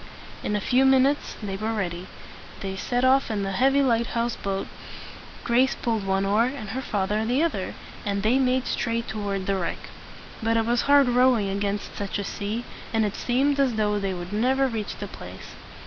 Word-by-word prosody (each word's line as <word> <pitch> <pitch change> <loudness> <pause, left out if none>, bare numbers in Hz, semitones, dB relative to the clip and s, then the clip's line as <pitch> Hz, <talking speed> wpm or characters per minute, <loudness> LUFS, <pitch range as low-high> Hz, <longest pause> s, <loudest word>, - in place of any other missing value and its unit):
In 210 - -1
a - - +1
few 250 +6 +3
minutes 270 +2 +3
they 195 -2 -3
were 220 +2 -2
ready. 180 -4 -3 0.5
They 190 -1 -4
set 245 +5 -1
off 265 +1 +4
in 210 -3 -1
the 195 - -2
heavy 270 +7 +3
lighthouse 235 -1 +1
boat. 195 0 -3 0.8
Grace 250 +3 +3
pulled 220 -4 -1
one 195 0 +1
oar, 210 +4 +3
and 250 -5 -5
her 260 - -3
father 210 -2 -1
the 250 +7 +1
other, 210 - -2 0.3
and 200 -1 -1
they 240 +5 +3
made 255 -1 +2
straight 230 0 -1
toward 200 -3 -3
the 195 0 0
wreck. 175 - -4 0.5
But 225 +1 +2
it 225 - +2
was 240 +1 +2
hard 285 -2 +7
rowing 245 -4 +3
against 200 +1 -2
such 200 0 -3
a 200 - -2
sea, 210 +4 -4 0.3
and 225 -1 +2
it 205 - -2
seemed 275 +3 +1
as 260 -4 +2
though 210 -1 +1
they 195 -2 -2
would 175 +2 -7
never 260 +5 +2
reach 225 -4 -4
the - - -5
place. - - -10
225 Hz, 195 wpm, -25 LUFS, 200-255 Hz, 0.8 s, hard